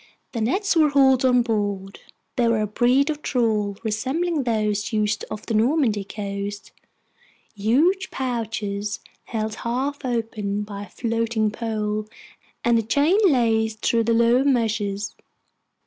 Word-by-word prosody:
The 230 - -3
nets 375 - +1
were 310 -2 +5
hauled 265 -2 +4
on 250 -2 +4
board. 205 -4 -2 0.4
They 240 -2 +2
were 230 -2 +2
a - - +1
breed 250 +7 +2
of 300 -1 -6
trawl 215 -7 0
resembling 270 +8 -1
those 215 -2 0
used 215 -1 0
off 215 -1 -7
the 230 - -3
Normandy 225 -2 +2
coast, 200 0 -5 0.8
huge 290 - +2
pouches 220 -5 -3 0.2
held 220 -2 -3
half 265 +5 -2
open 220 -4 -2
by 205 -1 -7
a - - -19
floating 230 -1 -1
pole 215 -1 -2 0.6
and 235 -1 +4
a - - +1
chain 290 - +2
laced 225 -6 +1
through 230 -1 +2
the 230 - +2
lower 235 +3 +4
meshes. 210 -6 0
225 Hz, 135 wpm, -23 LUFS, 210-255 Hz, 0.8 s, were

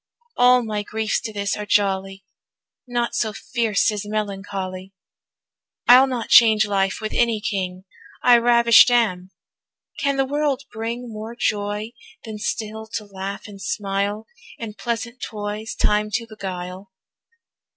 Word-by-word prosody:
All 250 0 +5
my 215 -2 -2
griefs 220 +1 -2
to 230 - -5
this 200 -1 -2
are 210 - -5
jolly, 195 -1 0 0.6
Naught 240 -1 -1
so 220 -2 -1
fierce 225 -2 0
as 210 -1 -4
melancholy. 195 -2 -4 0.9
I'll 255 +2 +8
not 250 -3 -4
change 220 -2 +7
life 195 -1 0
with 215 - -4
any 235 -2 +2
king, 185 -3 -3 0.4
I 245 -1 +7
ravisht 235 0 +6
am: 195 -7 +1 0.7
can 280 -1 0
the 270 - +2
world 285 -1 -1
bring 230 +3 -4
More 220 +2 -7
joy, 210 -1 -2 0.3
than 215 -2 -7
still 220 0 -4
to 225 -2 -3
laugh 195 +1 -6
and 200 -2 -11
smile, 200 +2 -2 0.3
In 220 -2 -6
pleasant 235 +2 -4
toys 210 +1 -5
time 210 0 +1
to 230 - -1
beguile? 190 -3 -7
215 Hz, 135 wpm, -22 LUFS, 200-235 Hz, 0.9 s, I'll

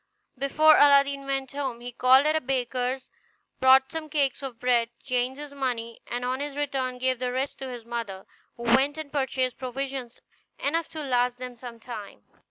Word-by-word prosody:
Before 300 +4 +5
Aladdin 280 -1 +5
went 270 -1 -2
home 270 -4 -3
he 245 +1 -7
called 255 +3 +5
at 310 +1 +3
a 315 - +1
baker's, 255 0 -2 0.5
bought 265 0 +6
some 320 -1 -5
cakes 285 -4 +1
of 260 -4 -7
bread, 240 -2 +2
changed 255 +1 -1
his 295 -1 -8
money, 240 -4 -3
and 245 +1 -3
on 255 +1 -1
his 290 0 -5
return 265 -3 -2
gave 255 -1 0
the 250 -1 -1
rest 260 +2 -2
to 265 - -5
his 240 -2 -8
mother, 230 -5 -5 0.3
who 235 - -8
went 265 +5 +3
and 310 -2 -7
purchased 260 -3 -1
provisions 260 -1 -5 0.4
enough 325 +3 0
to 310 -1 -6
last 245 -2 +1
them 250 -1 -7
some 235 -1 -10
time. 230 -4 -9
260 Hz, 180 wpm, -26 LUFS, 245-275 Hz, 0.5 s, bought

